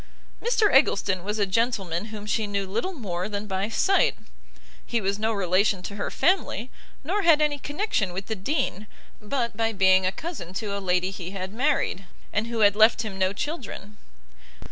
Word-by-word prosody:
Mr 455 -3 +2
Eggleston 195 -9 +3
was 210 +2 -2
a 205 - +2
gentleman 195 -4 0
whom 215 -2 -8
she 215 0 0
knew 200 -1 -1
little 225 - -2
more 190 - -4
than 205 0 -4
by 195 +1 -2
sight; 390 +11 +3 0.7
he 235 - -1
was 200 0 -1
no 220 +1 +1
relation 195 -1 +1
to 200 - -6
her 205 - -3
family, 260 - 0 0.3
nor 380 +8 0
had 330 -4 +5
any 300 -1 +1
connection 290 - -1
with 190 +2 -5
the 220 - -3
Dean, 215 - -2 0.3
but 235 +1 -2
by 225 +1 +1
being 190 -2 +4
a - - +1
cousin 195 - -7
to 205 -1 -3
a 200 - -3
lady 180 0 +1
he 180 -2 -6
had 190 +1 -5
married, 250 -7 0 0.3
and 215 +2 0
who 235 -1 -2
had 205 -1 +5
left 220 +1 +5
him 200 -3 -6
no 185 0 +2
children. 210 - -6
210 Hz, 185 wpm, -25 LUFS, 190-245 Hz, 0.7 s, had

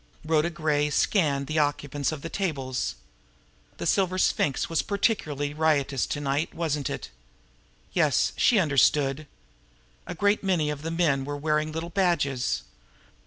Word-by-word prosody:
Rhoda 155 +1 +2
Gray 150 -3 0
scanned 145 -4 +1
the 155 +3 -1
occupants 145 -1 -1
of 155 -3 -7
the 165 - -4
tables. 140 -10 -2 0.8
The - - -5
Silver 185 -1 +1
Sphinx 145 -6 +1
was 165 - 0
particularly 155 -9 -1
riotous 145 -4 +1
to 145 - -3
night, 145 +4 -1
wasn't 150 -4 -1
it? - - -6 0.8
Yes, - - +2
she 240 - +4
understood! 145 - +2 0.8
A - - -5
great 205 +5 +2
many 170 -6 +1
of 145 -1 -6
the 160 - -4
men 165 -5 +1
were 145 +1 -4
wearing 155 +1 0
little 165 +2 -5
badges. 145 - 0
150 Hz, 140 wpm, -26 LUFS, 140-170 Hz, 0.8 s, she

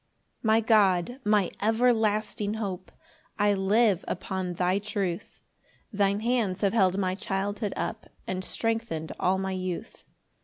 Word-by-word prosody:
1 - - -3
My 225 +1 +5
God, 210 +1 +3
my 210 -4 +2
everlasting 215 -2 +1
hope, 190 -4 -5 0.5
I 205 -1 +3
live 200 0 +3
upon 185 -1 -3
thy 180 +3 +1
truth; 200 -4 -4 0.5
Thine 200 0 +1
hands 230 -5 0
have 200 -1 +2
held 190 -4 +3
my 185 -2 0
childhood 200 +2 -2
up, - - -4 0.2
And 185 0 -3
strengthen'd 225 -8 -2
all 185 +1 +2
my 190 0 -2
youth. 185 -2 -5
200 Hz, 130 wpm, -27 LUFS, 185-220 Hz, 0.5 s, My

